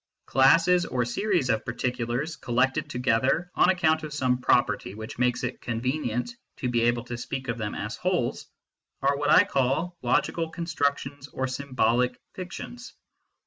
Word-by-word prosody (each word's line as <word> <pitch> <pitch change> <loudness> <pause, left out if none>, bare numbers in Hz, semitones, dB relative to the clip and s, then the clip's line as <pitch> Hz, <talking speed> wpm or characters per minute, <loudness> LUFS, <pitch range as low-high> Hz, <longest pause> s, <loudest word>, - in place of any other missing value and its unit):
Classes 165 +7 +5
or 125 -2 0
series 175 - 0
of 110 - 0
particulars, 125 +5 -2
collected 130 +1 0
to - - -5
gether 130 +8 +1
on - - +4
account 160 -4 +3
of 155 -1 -6
some 125 -3 +1
property 120 -5 +1
which 110 +2 -8
makes 125 -1 +1
it 125 - -4
con 115 -1 -3
venient 125 - -1 0.3
to 125 - -2
be 120 -1 +1
able 120 0 +2
to 120 0 -6
speak 130 +2 -5
of 115 +1 -2
them 105 -2 -3
as 105 +2 -4
wholes, 180 -9 -1 0.6
are 140 +1 +3
what 145 +1 -1
I 185 - +8
call 155 +1 0
logical 165 -1 +1
constructions 145 -4 -2
or 130 - -3
symbolic 130 -2 0
fictions. 215 +6 -8
130 Hz, 160 wpm, -26 LUFS, 120-160 Hz, 0.6 s, I